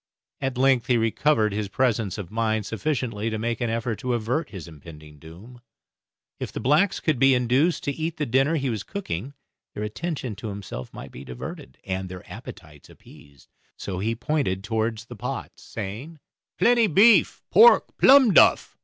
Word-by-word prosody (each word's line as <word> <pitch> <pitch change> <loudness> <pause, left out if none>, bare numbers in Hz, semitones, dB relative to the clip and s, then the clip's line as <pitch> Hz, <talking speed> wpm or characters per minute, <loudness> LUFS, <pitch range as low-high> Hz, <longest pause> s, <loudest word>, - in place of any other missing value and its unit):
At 135 -2 -3
length 130 -3 +3
he 125 - +3
recovered 115 -1 +1
his 105 0 -2
presence 110 -4 0
of 100 -3 -7
mind 110 -1 -1
sufficiently 115 -3 -2
to 110 - -3
make 115 +2 -3
an 120 - 0
effort 115 0 -2
to 125 -1 -1
avert 125 +8 -2
his 95 -4 -9
impending 75 -1 -13
doom. 95 - -14 0.8
If - - -5
the - - -5
blacks 160 +9 +2
could 155 -6 0
be 135 0 +5
induced 125 +8 +1
to 145 - -1
eat 160 +3 -4
the 150 - -1
dinner 135 +6 +2
he 135 -4 -1
was 110 -3 -3
cooking 140 - -6 0.4
their 105 - -4
attention 135 +1 -4
to 115 - -7
himself 100 - -7
might - - -10
be 65 - -10
diverted, 65 +1 -9
and 95 -1 -4
their 90 0 -10
appetites 90 - -12
appeased, 70 -1 -18 0.3
so 95 -2 -5
he 115 +4 -1
pointed 125 -7 -2
towards 110 0 -2
the 120 - -10
pots, 105 - -6
saying, 115 +10 -7 0.4
"Plenty 235 -2 +4
beef, 205 +6 +4
pork, 480 +1 +6
plum 265 -6 +7
duff." - - +4
115 Hz, 170 wpm, -24 LUFS, 100-140 Hz, 0.8 s, plum